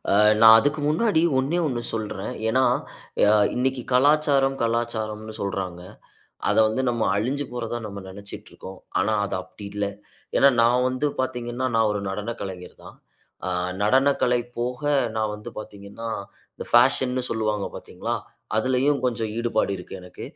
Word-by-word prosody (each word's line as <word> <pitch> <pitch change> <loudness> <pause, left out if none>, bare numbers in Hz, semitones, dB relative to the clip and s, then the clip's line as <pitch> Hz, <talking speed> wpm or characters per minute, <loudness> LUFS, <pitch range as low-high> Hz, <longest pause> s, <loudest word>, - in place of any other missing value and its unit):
ஆ - - +3 0.3
நான் 110 0 +10
அதுக்கு 145 +5 +1
முன்னாடி 160 +2 +2 0.2
ஒன்னே 140 +7 0
ஒண்ணு 125 -5 -2
சொல்றேன். 105 -3 -4 0.2
ஏனா, 130 +4 +3 0.6
அ - - +5 0.2
இன்னிக்கு 130 0 0
கலாச்சாரம், 140 0 +4
கலாச்சாரம்னு 110 -2 -2
சொல்றாங்க. 95 -3 -3 0.7
அத - - +2
வந்து 110 +4 -1
நம்ம 120 -1 -2
அழிஞ்சி 130 +8 -1
போறதா 120 -1 -3
நம்ம 100 -1 -7
நினச்சிகிட்டு 100 +1 -9
இருக்கோம். 95 0 -10 0.2
ஆனா, 105 +3 +1
அது 100 - -3
அப்டி 95 +2 -12
இல்ல. 105 0 -1 0.5
ஏனா, 140 - +7
நான் 125 +2 +3
வந்து 130 +3 0
பார்த்தீங்கன்னா, 125 0 -2
நான் 115 -1 +3
ஒரு 105 -1 -2
நடன 105 +4 -3
கலைஞர் 95 -2 -7
தான். - - -12 0.5
ஆ 95 - -1 0.3
நடனக்கலை 130 +1 +3 0.2
போக 125 +1 -3 0.4
நான் 110 -1 0
வந்து 105 +3 -9
பார்த்தீங்கன்னா, 105 +2 -8 0.5
இந்த - - -7
பேஷன்னு 130 +1 +4
சொல்வாங்க 110 -2 -1
பார்த்தீங்களா, - - -4 0.4
அதிலயும். 130 +5 +2
கொஞ்சம் 115 -3 -2
ஈடுபாடு 115 -3 0
இருக்கு 90 - -9
எனக்கு. 90 - -9
115 Hz, 145 wpm, -24 LUFS, 105-130 Hz, 0.7 s, நான்